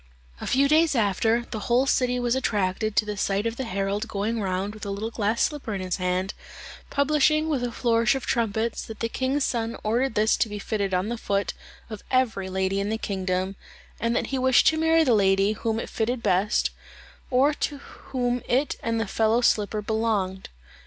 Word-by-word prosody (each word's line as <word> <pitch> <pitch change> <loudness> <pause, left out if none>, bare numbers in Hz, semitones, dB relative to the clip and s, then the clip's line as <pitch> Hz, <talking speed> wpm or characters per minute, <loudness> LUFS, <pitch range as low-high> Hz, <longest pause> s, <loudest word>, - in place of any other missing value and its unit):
A - - -5
few 275 +2 +3
days 310 0 +4
after, 225 +2 +1
the 220 - -3
whole 245 +3 +4
city 250 -2 +1
was 240 -1 +1
attracted 210 -4 0
by 215 - +3
the 210 0 -4
sight 200 +1 0
of 230 +2 -3
a - - -1
herald 200 +1 -2
going 220 +2 -2
round 190 +1 -2
with 215 - -11
a 200 - -4
little 205 +3 -3
glass 220 0 0
slipper 280 -8 -2
in 190 - -3
his 185 -1 -2
hand, 185 +1 -1 0.6
publishing, 305 +2 +2
with 275 -5 0
a 245 - -2
flourish 230 0 +2
of 270 - -4
trumpets, 225 -1 0
that 220 -1 -9
the 230 - 0
king's 265 +4 -1
son 230 -1 -2
ordered 235 +3 0
this 215 +1 +3
to 225 - +1
be 210 - -5
fitted 200 -2 -2
on 185 +4 0
the 240 -1 -3
foot 200 -4 -1 0.3
of 215 -3 -8
every 225 -7 +1
lady 190 +1 0
in 200 +1 -1
the 220 - -1
kingdom, 190 -2 -2 0.4
and 230 +1 0
that - - +1
he 265 - +1
wished 260 -1 +4
to 315 - -1
marry 320 0 +4
the 255 -6 +3
lady 195 -1 +3
whom 220 +1 -2
it - - -4
fitted 235 +2 -2
best, 195 +5 +2 0.6
or 270 +3 +3
to 290 0 -3
whom 245 -3 -3
it 265 +4 +1
and 230 0 -1
the 225 - 0
fellow 220 +4 +2
slipper 210 -2 +1
belonged. 205 -4 -1
225 Hz, 200 wpm, -25 LUFS, 200-250 Hz, 0.6 s, days